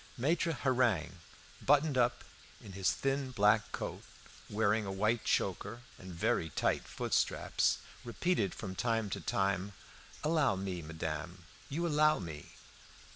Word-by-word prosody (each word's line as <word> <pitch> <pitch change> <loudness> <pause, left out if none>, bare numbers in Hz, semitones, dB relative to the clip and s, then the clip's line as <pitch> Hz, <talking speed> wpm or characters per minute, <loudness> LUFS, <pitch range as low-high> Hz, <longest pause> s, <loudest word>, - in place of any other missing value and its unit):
Maitre 160 +6 +1
Hareng, 125 - +1 0.4
buttoned 145 +1 +4
up 125 -1 +2 0.4
in 100 - -11
his 95 0 +1
thin 135 0 -1
black 105 -2 +3
coat, - - -4 0.5
wearing 105 +1 +2
a 95 - -4
white 110 +4 +1
choker 100 +5 0 0.2
and 95 0 -9
very 85 -1 0
tight - - 0
foot - - -4
straps, - - +2 0.3
repeated 120 - 0
from 95 -3 -5
time 115 0 0
to - - -3
time 100 -4 0 0.5
"Allow 155 -8 +3
me, 95 -2 -3
madame. 80 +2 -5 0.3
You 165 +5 -1
allow 155 -1 +4
me?" 80 -6 -8
110 Hz, 130 wpm, -33 LUFS, 95-135 Hz, 0.5 s, buttoned